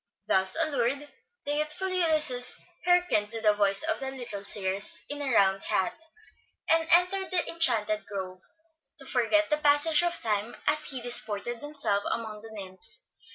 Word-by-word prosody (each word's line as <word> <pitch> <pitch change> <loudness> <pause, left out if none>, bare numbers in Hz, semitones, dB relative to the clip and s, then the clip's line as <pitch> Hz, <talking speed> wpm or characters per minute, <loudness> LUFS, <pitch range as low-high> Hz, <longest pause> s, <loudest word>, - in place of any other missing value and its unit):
Thus 190 -2 +5
allured, 280 -2 -1 0.4
the 290 - -1
youthful 305 +5 -1
Ulysses 310 -9 +2 0.3
hearkened 355 -13 +2
to 225 0 +1
the 215 -1 +2
voice 200 +3 +3
of 320 0 -2
the 270 - -4
little 240 -7 -7
Circe 200 0 -2
in 290 0 -6
a 275 -2 -2
round 195 -3 +2
hat, 230 +10 -2 0.7
and 325 0 +1
entered 365 +2 +2
the 360 -2 +1
enchanted 215 -10 0
grove, 185 -2 -7 0.6
to 275 - -8
forget 270 +6 0
the 300 - +2
passage 295 +2 +4
of 345 0 -1
time 215 0 -3
as 305 - 0
he 260 -3 -2
disported 235 -1 +2
himself 285 -9 -1
among 220 -2 -5
the 225 - -12
nymphs. 195 - -3
250 Hz, 155 wpm, -27 LUFS, 210-310 Hz, 0.7 s, Thus